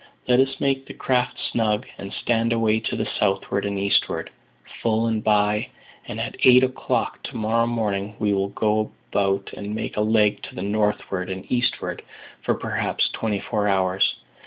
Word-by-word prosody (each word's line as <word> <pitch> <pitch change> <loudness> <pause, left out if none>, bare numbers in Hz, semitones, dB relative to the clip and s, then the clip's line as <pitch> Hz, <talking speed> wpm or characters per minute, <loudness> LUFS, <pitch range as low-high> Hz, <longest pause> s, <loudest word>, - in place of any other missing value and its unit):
Let 125 0 +5
us 135 0 +2
make 135 -1 0
the - - -9
craft 125 -1 0
snug, 110 +1 +1
and 100 0 -6
stand 115 0 +1
away 110 -1 +2
to 110 - -3
the - - -1
southward 100 0 0
and 100 0 -2
eastward, 100 0 0 0.5
full 115 0 +2
and 110 -2 0
by, 105 +2 +2 0.4
and - - -5
at - - -4
eight 125 0 +8
o'clock 130 0 -1
to - - -6
morrow 115 +1 +2
morning 105 -3 -1
we 105 -1 +1
will 100 0 0
go 110 +1 0 0.2
about 100 -1 +1
and 105 +1 -5
make 110 - -4
a - - +2
leg 105 -1 +3
to - - -9
the 90 - -4
northward 100 -2 -1
and 95 0 -5
eastward 125 -1 -1 0.4
for - - +1
perhaps - - -1
twenty 105 -3 -1
four 105 -1 -1
hours. 95 -1 +2
105 Hz, 175 wpm, -24 LUFS, 100-115 Hz, 0.5 s, eight